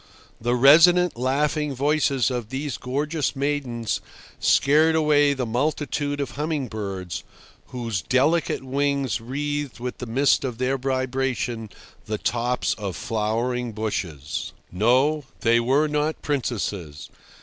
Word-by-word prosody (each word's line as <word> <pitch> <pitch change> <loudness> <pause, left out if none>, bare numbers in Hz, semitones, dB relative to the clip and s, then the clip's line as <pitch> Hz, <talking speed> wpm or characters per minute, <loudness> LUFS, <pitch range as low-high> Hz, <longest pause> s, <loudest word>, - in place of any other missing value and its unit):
The 120 +2 +1
resonant, 165 +7 +6
laughing 145 +3 0
voices 140 -1 +1
of 120 -4 -4
these 140 +2 -3
gorgeous 145 +1 -2
maidens 135 -5 -2 0.4
scared 155 +3 +4
away 145 -2 +4
the 130 -2 -2
multitude 145 +3 -1
of 140 - -2
humming 150 -3 -2
birds, 95 -5 -5 0.4
whose 115 -7 -3
delicate 140 - +1
wings 140 -2 0
wreathed 145 +2 -3
with 125 +1 -5
the 125 - -5
mist 135 +6 +2
of 125 -4 -3
their 130 +2 0
vibration 130 -3 -2 0.4
the 110 - -2
tops 120 +3 0
of 100 -3 -4
flowering 115 +2 -2
bushes. 90 -9 -4 0.2
No, 130 - +2 0.2
they 115 0 +4
were 135 +6 +2
not 150 +1 -1
princesses. 100 - -3
130 Hz, 120 wpm, -24 LUFS, 115-145 Hz, 0.4 s, resonant